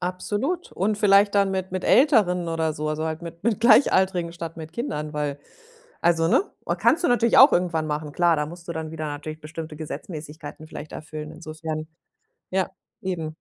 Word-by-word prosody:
Absolut. 205 Hz, -, -2 dB
Und 205 Hz, +3 st, 0 dB
vielleicht 200 Hz, -1 st, +5 dB
dann 200 Hz, -1 st, +3 dB
mit 190 Hz, -1 st, -3 dB
mit 185 Hz, -1 st, -3 dB
Älteren 180 Hz, -, +4 dB
oder 160 Hz, -1 st, 0 dB
so, 155 Hz, 0 st, -3 dB
also 155 Hz, +1 st, -2 dB
halt 160 Hz, +1 st, -4 dB
mit 170 Hz, 0 st, -9 dB
mit 220 Hz, -1 st, +1 dB
Gleichaltrigen 190 Hz, -7 st, +4 dB
statt 165 Hz, -1 st, -7 dB
mit 160 Hz, -1 st, -8 dB
Kindern, 160 Hz, -, -4 dB
weil 145 Hz, -2 st, -2 dB, 0.6 s
also 165 Hz, -1 st, +3 dB
ne? 380 Hz, -, +4 dB, 0.3 s
Kannst 335 Hz, -, +3 dB
du -, -, +4 dB
natürlich 235 Hz, -1 st, +4 dB
auch 270 Hz, +2 st, +9 dB
irgendwann 170 Hz, -3 st, +1 dB
machen, 150 Hz, 0 st, -3 dB
klar, 170 Hz, +1 st, +3 dB
da 150 Hz, 0 st, -1 dB
musst 170 Hz, +2 st, -11 dB
du -, -, -2 dB
dann 160 Hz, -1 st, -5 dB
wieder 155 Hz, -1 st, -4 dB
natürlich 150 Hz, +1 st, -6 dB
bestimmte 155 Hz, +1 st, -7 dB
Gesetzmäßigkeiten 155 Hz, 0 st, -8 dB
vielleicht 155 Hz, -, -9 dB
erfüllen. 155 Hz, 0 st, -7 dB
Insofern 155 Hz, -1 st, -6 dB, 0.6 s
ja, 190 Hz, -1 st, +1 dB, 0.3 s
eben. 165 Hz, -6 st, -4 dB
165 Hz, 180 wpm, -24 LUFS, 155-190 Hz, 0.6 s, auch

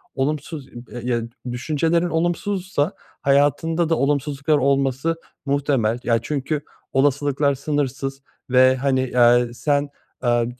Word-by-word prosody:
olumsuz 145 Hz, +1 st, -2 dB
i 120 Hz, 0 st, -12 dB
b -, -, -12 dB
yedü 120 Hz, -2 st, -1 dB, 0.2 s
düşüncelerin 160 Hz, +7 st, 0 dB
olumsuzsa 175 Hz, 0 st, -1 dB, 0.3 s
hayatında 145 Hz, +4 st, +2 dB
da 165 Hz, -, +3 dB
olumsuzluklar 145 Hz, +1 st, +1 dB
olması 140 Hz, +3 st, +1 dB, 0.3 s
muhtemel. 135 Hz, -5 st, +1 dB
Ya, 115 Hz, -1 st, +2 dB
çünkü 150 Hz, +1 st, -2 dB, 0.3 s
olasılıklar 140 Hz, +1 st, +2 dB
sınırsız 135 Hz, -1 st, -2 dB, 0.3 s
ve, 130 Hz, +1 st, +5 dB
hani, 130 Hz, -1 st, 0 dB
ya, 120 Hz, 0 st, +6 dB
eee, 120 Hz, -1 st, -3 dB
sen, 145 Hz, +3 st, 0 dB, 0.3 s
aaa, 120 Hz, -1 st, +2 dB
140 Hz, 120 wpm, -22 LUFS, 130-150 Hz, 0.3 s, ya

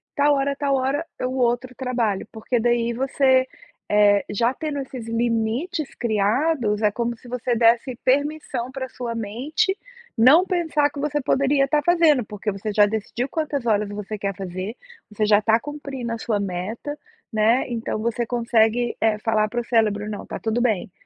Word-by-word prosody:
Tal 290 Hz, 0 st, +4 dB
hora 275 Hz, 0 st, +1 dB
a -, -, -3 dB
tal 280 Hz, -1 st, 0 dB
hora, 270 Hz, +4 st, 0 dB, 0.2 s
é -, -, -1 dB
o 255 Hz, -, -1 dB
outro 250 Hz, 0 st, 0 dB
trabalho", 235 Hz, -7 st, -1 dB
porque, 230 Hz, +2 st, -2 dB
daí, 235 Hz, 0 st, +1 dB
você, 260 Hz, +1 st, +2 dB, 0.4 s
eh, 205 Hz, -1 st, +5 dB
já 230 Hz, +4 st, +1 dB
tendo 300 Hz, 0 st, -4 dB
esses 255 Hz, -4 st, -7 dB
limites 230 Hz, -, -1 dB
criados, 220 Hz, +1 st, +1 dB
é 210 Hz, -, +4 dB
como 235 Hz, +2 st, -2 dB
se 245 Hz, -, -16 dB
você 245 Hz, 0 st, -1 dB
desse 235 Hz, +2 st, +3 dB
permissão 275 Hz, -2 st, 0 dB
para 265 Hz, 0 st, -4 dB
a -, -, -12 dB
sua 240 Hz, -2 st, -5 dB
mente 245 Hz, -, -1 dB, 0.4 s
não 275 Hz, +11 st, +6 dB
pensar 320 Hz, -5 st, +1 dB
que 290 Hz, -, -8 dB
você 295 Hz, +1 st, -1 dB
poderia 275 Hz, +1 st, +2 dB
estar 295 Hz, +2 st, +1 dB
fazendo, 330 Hz, -7 st, +4 dB
porque 210 Hz, 0 st, -4 dB
você 200 Hz, +2 st, -4 dB
já 205 Hz, 0 st, +6 dB
decidiu 220 Hz, +4 st, -3 dB
quantas 290 Hz, -5 st, -2 dB
horas 210 Hz, -2 st, +1 dB
você 210 Hz, +1 st, -5 dB
quer 200 Hz, -1 st, -2 dB
fazer, 190 Hz, +3 st, -5 dB, 0.3 s
você 215 Hz, 0 st, -1 dB
já 210 Hz, -1 st, +5 dB
está 220 Hz, +1 st, +3 dB
cumprindo 275 Hz, -4 st, -6 dB
a -, -, -3 dB
sua 220 Hz, -2 st, -1 dB
meta, 200 Hz, +10 st, -4 dB, 0.3 s
né, 225 Hz, +3 st, +3 dB
então 230 Hz, -2 st, -3 dB
você 235 Hz, +1 st, -1 dB
consegue, 235 Hz, 0 st, +1 dB
eh, 220 Hz, -1 st, +2 dB
falar 215 Hz, -1 st, +1 dB
para 240 Hz, +2 st, -2 dB
o -, -, -8 dB
cérebro: 215 Hz, -3 st, +1 dB
"Não, 210 Hz, -, -6 dB
tá -, -, -6 dB
tudo 225 Hz, +1 st, -1 dB
bem, 215 Hz, -7 st, 0 dB
235 Hz, 180 wpm, -23 LUFS, 215-270 Hz, 0.4 s, não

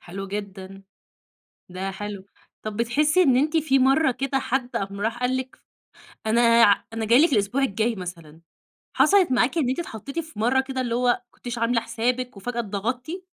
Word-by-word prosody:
حلو 195 Hz, +3 st, -7 dB
جدًا. 195 Hz, -1 st, -7 dB, 0.9 s
ده 190 Hz, +2 st, -4 dB
حلو. 200 Hz, 0 st, -7 dB, 0.4 s
طب 215 Hz, -1 st, -5 dB
بتحسّي 295 Hz, +9 st, +2 dB
إن 260 Hz, -5 st, +4 dB
أنتِ 305 Hz, +4 st, +2 dB
في 280 Hz, -4 st, +2 dB
مرّة 270 Hz, +3 st, +4 dB
كده 270 Hz, +2 st, -1 dB
حد 255 Hz, -1 st, -2 dB
قام 200 Hz, -2 st, -3 dB
راح 225 Hz, +3 st, -2 dB
قال 250 Hz, +1 st, 0 dB
لِك 260 Hz, 0 st, -7 dB, 0.7 s
أنا 225 Hz, +2 st, +3 dB, 0.2 s
ع 200 Hz, -, +4 dB
أنا 225 Hz, -1 st, -2 dB
جاي 235 Hz, +4 st, +5 dB
لِك 335 Hz, -, 0 dB
الأسبوع 210 Hz, +5 st, +1 dB
الجاي 225 Hz, -2 st, 0 dB
مثلًا، 165 Hz, -4 st, -9 dB, 0.5 s
حصلت 385 Hz, -8 st, +4 dB
معاكِ 255 Hz, +6 st, +2 dB
إن 280 Hz, -6 st, +1 dB
أنت 260 Hz, -, -1 dB
اتحطّيتِ 275 Hz, -1 st, -6 dB
في 320 Hz, -8 st, -6 dB
مرّة 250 Hz, +4 st, +2 dB
كده 265 Hz, -1 st, -4 dB
اللي 240 Hz, -2 st, -2 dB
هو 250 Hz, +1 st, 0 dB
ما 245 Hz, -, +2 dB
كنتيش 240 Hz, -1 st, -7 dB
عاملة 230 Hz, 0 st, +1 dB
حسابِك 245 Hz, +2 st, -2 dB
وفجأة 235 Hz, +4 st, -4 dB
اتضغطتِ؟ 245 Hz, -, -4 dB
240 Hz, 180 wpm, -24 LUFS, 205-265 Hz, 0.9 s, جاي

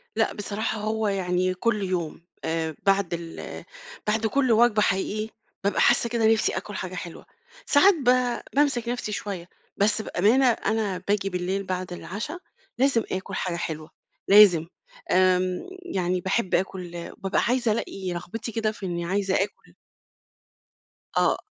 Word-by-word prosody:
لأ -, -, +1 dB
بصراحة 210 Hz, +2 st, -3 dB
هو 215 Hz, 0 st, 0 dB
يعني 185 Hz, -2 st, 0 dB
كل 210 Hz, +2 st, 0 dB
يوم، 175 Hz, -4 st, -2 dB, 0.2 s
آآ 160 Hz, -1 st, -1 dB
بعد 195 Hz, -3 st, +2 dB
ال 170 Hz, -1 st, -6 dB, 0.4 s
بعد 220 Hz, +1 st, +1 dB
كل 260 Hz, +1 st, +2 dB
وجبة 225 Hz, -1 st, +5 dB
حقيقي، 210 Hz, +2 st, 0 dB, 0.3 s
بابقى 200 Hz, -, +1 dB
حاسة 235 Hz, -, +4 dB
كده 230 Hz, -1 st, +1 dB
نِفسي 220 Hz, -, +1 dB
آكُل 200 Hz, +2 st, -6 dB
حاجة 185 Hz, -1 st, -5 dB
حلوة، 175 Hz, -2 st, -7 dB, 0.4 s
ساعات 380 Hz, +8 st, +6 dB
ب 250 Hz, -5 st, +2 dB, 0.2 s
بامسك 275 Hz, -5 st, +2 dB
نَفسي 245 Hz, -3 st, -3 dB
شوية. 195 Hz, -4 st, -5 dB, 0.3 s
بس 215 Hz, +2 st, +2 dB
بأمانة 220 Hz, +7 st, +3 dB
أنا 220 Hz, -5 st, +1 dB
باجي 200 Hz, -1 st, +1 dB
بالليل 185 Hz, +2 st, -2 dB
بعد 185 Hz, -1 st, -4 dB
العُشا 215 Hz, -, -5 dB, 0.4 s
لازم 255 Hz, -3 st, +3 dB
آكُل 190 Hz, +1 st, -3 dB
حاجة 180 Hz, -2 st, -2 dB
حلوة، 155 Hz, -2 st, -4 dB, 0.4 s
لازم. 195 Hz, -5 st, +7 dB, 0.4 s
آمم 185 Hz, 0 st, +3 dB, 0.3 s
يعني 180 Hz, -1 st, 0 dB
باحب 190 Hz, +2 st, 0 dB
آكُل 180 Hz, -2 st, -3 dB
بابقى 195 Hz, -1 st, 0 dB
عايزة 240 Hz, -2 st, +2 dB
الاقي 190 Hz, -4 st, -3 dB
رغبتي 220 Hz, +7 st, -5 dB
كده 220 Hz, -1 st, 0 dB
في 210 Hz, -2 st, -8 dB
إني 175 Hz, -1 st, -3 dB
عايزة 195 Hz, +1 st, 0 dB
آكُل 195 Hz, -, -3 dB, 1.4 s
آه. -, -, +3 dB
200 Hz, 140 wpm, -25 LUFS, 180-225 Hz, 1.4 s, لازم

